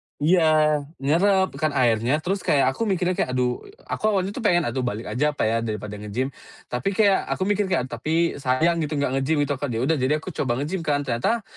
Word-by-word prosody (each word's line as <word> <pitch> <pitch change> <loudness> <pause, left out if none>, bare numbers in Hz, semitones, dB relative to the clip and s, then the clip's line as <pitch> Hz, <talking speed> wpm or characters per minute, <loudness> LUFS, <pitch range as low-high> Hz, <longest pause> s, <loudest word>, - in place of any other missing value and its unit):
iya 155 -2 +3 0.2
nyerap 190 +7 +2
kan 155 -2 0
airnya 120 +5 +2
terus 195 +2 -1
kayak 135 -5 +2
aku 225 +11 -3
mikirnya 180 -2 +1
kayak 125 0 0
aduh 125 -1 0 0.2
aku - - -6
awalnya 190 +1 0
tuh 235 - -6
pengen 175 -7 +2
aduh 120 +1 -2
balik 115 -3 -3
aja 150 +6 0
apa - - -1
ya 110 +1 +2
daripada 105 -2 -5
nge-gym 120 +6 -3 0.4
tapi 130 +11 -2
kayak 200 -3 +3
aku 185 - -2
mikir 205 0 +1
kayak 130 -8 -1
tapi 165 +2 0
sayang 150 +6 +1
gitu 150 -1 -2
gak 140 -2 0
nge-gym 145 +3 +1
itu 145 - -3
kan 145 - -2
ya 115 0 -2
udah 150 +1 +1
jadi 130 +4 +2
aku 185 - -6
coba 125 -5 -1
nge-gym 180 +5 -3
kan 145 -1 +1
ternyata, 135 - -1
145 Hz, 215 wpm, -23 LUFS, 125-175 Hz, 0.4 s, iya